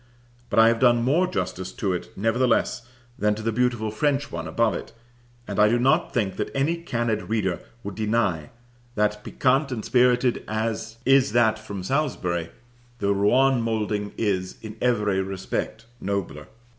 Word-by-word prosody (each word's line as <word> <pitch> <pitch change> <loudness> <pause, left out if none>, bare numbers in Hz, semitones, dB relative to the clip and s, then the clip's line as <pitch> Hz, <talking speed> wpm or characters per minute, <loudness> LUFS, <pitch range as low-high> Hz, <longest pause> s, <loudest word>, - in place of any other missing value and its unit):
but - - -2
I 110 0 +8
have 115 -1 +1
done 120 -1 +4
more 160 +9 +3
justice 95 - -3
to 95 -3 -1
it 90 - -4
nevertheless 115 +2 +1 0.3
than 105 0 +2
to 110 - -7
the 115 - 0
beautiful 120 -2 0
French 140 +5 0
one 85 -1 -5
above 115 +8 +1
it; - - -7 0.5
and 100 - -3
I 105 0 +6
do 120 - +3
not 135 +8 +2
think 100 -6 -1
that 105 - -2
any 145 +5 +1
candid 120 -10 -2
reader 100 -6 0 0.2
would 100 - -5
deny 105 -8 0 0.5
that, 105 0 0
piquant 135 +1 +1
and 115 -4 -4
spirited 125 0 +3
as 110 +1 -3
is 135 0 +4
that 110 -2 +3
from 100 -4 -7
Salisbury, 90 - -1 0.5
the 100 -3 +1
Rouen 125 +6 +3
moulding 105 -2 -1
is, 95 -4 -1
in 110 -1 -7
every 105 -6 +1
respect, 95 +3 -4
nobler. 95 -8 -3
110 Hz, 160 wpm, -24 LUFS, 100-125 Hz, 0.5 s, I